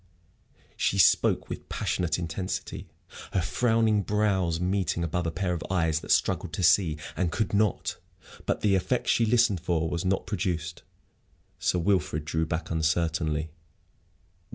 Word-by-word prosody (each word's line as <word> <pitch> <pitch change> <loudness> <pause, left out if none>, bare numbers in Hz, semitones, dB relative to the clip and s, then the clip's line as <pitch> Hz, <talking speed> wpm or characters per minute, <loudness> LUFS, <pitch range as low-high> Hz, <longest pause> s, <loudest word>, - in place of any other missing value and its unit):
She - - 0
spoke - - +4
with - - -7
passionate 90 -2 -1
intensity, 90 +3 -4 0.5
her 95 - +2
frowning 110 +2 +2
brows 95 -5 +1
meeting 90 -1 0
above 85 +1 -1
a - - -1
pair 90 0 -1
of 85 - -4
eyes 80 -4 +1
that - - -12
struggled 80 - +1
to 90 - -2
see 85 -3 +4 0.2
and 90 -3 0
could 105 +5 -1
not. 105 -1 +1 0.5
But - - 0
the 105 -2 +3
effect 95 +6 0
she 115 - +3
listened 115 -4 +3
for 80 -1 0
was 85 +2 -2
not 95 +1 0
produced. 85 -4 -3 0.8
Sir - - +1
Wilfrid 85 -4 0
drew 80 +1 -1
back 80 +1 -3
uncertainly. 80 -1 0
90 Hz, 145 wpm, -27 LUFS, 80-100 Hz, 0.8 s, spoke